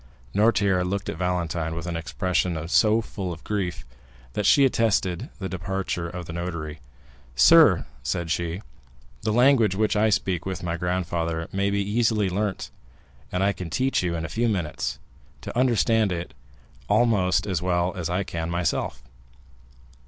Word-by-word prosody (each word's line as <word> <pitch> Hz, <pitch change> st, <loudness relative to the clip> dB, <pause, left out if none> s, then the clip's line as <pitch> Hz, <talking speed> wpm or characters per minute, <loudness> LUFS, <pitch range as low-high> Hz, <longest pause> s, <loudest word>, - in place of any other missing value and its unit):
Noirtier 100 Hz, -3 st, +3 dB
looked 100 Hz, +2 st, -2 dB
at -, -, -4 dB
Valentine 85 Hz, -3 st, -1 dB
with 85 Hz, +1 st, -5 dB
an 85 Hz, -1 st, -3 dB
expression 85 Hz, 0 st, -1 dB
so 110 Hz, +5 st, +4 dB
full 95 Hz, -4 st, -5 dB
of 80 Hz, -, -8 dB
grief, 90 Hz, -7 st, -3 dB, 0.5 s
that 105 Hz, +3 st, 0 dB
she 140 Hz, -, +6 dB
arrested 110 Hz, -, 0 dB
the 95 Hz, -, -4 dB
departure 90 Hz, -1 st, -3 dB
of 90 Hz, 0 st, -6 dB
the 80 Hz, -, -7 dB
notary. 85 Hz, -3 st, -5 dB, 0.6 s
"Sir," 60 Hz, -, +6 dB, 0.2 s
said 80 Hz, +4 st, -2 dB
she, 85 Hz, +3 st, -2 dB, 0.6 s
"the 110 Hz, -, 0 dB
language 120 Hz, -4 st, +4 dB
which 105 Hz, +1 st, +1 dB
I 110 Hz, +1 st, +3 dB
speak 95 Hz, -4 st, 0 dB
with 95 Hz, 0 st, -5 dB
my 85 Hz, -1 st, -2 dB
grandfather 85 Hz, -2 st, -2 dB
may 100 Hz, +1 st, 0 dB
be 100 Hz, 0 st, 0 dB
easily 110 Hz, -3 st, +1 dB
learnt, 100 Hz, +1 st, -2 dB, 0.6 s
and 90 Hz, +1 st, 0 dB
I 100 Hz, 0 st, +2 dB
can 90 Hz, -3 st, -7 dB
teach 130 Hz, +11 st, +1 dB
you 85 Hz, -2 st, -1 dB
in 80 Hz, -1 st, -3 dB
a 80 Hz, -, -7 dB
few 120 Hz, +1 st, +2 dB
minutes, 90 Hz, -8 st, -2 dB, 0.4 s
to -, -, -7 dB
understand 115 Hz, -4 st, +3 dB
it 85 Hz, 0 st, -4 dB, 0.6 s
almost 100 Hz, -6 st, +3 dB
as 95 Hz, -6 st, -1 dB
well 90 Hz, 0 st, 0 dB
as 85 Hz, -2 st, -3 dB
I 90 Hz, +3 st, 0 dB
can 85 Hz, -3 st, -4 dB
myself. 85 Hz, 0 st, -1 dB
90 Hz, 160 wpm, -25 LUFS, 85-105 Hz, 0.6 s, she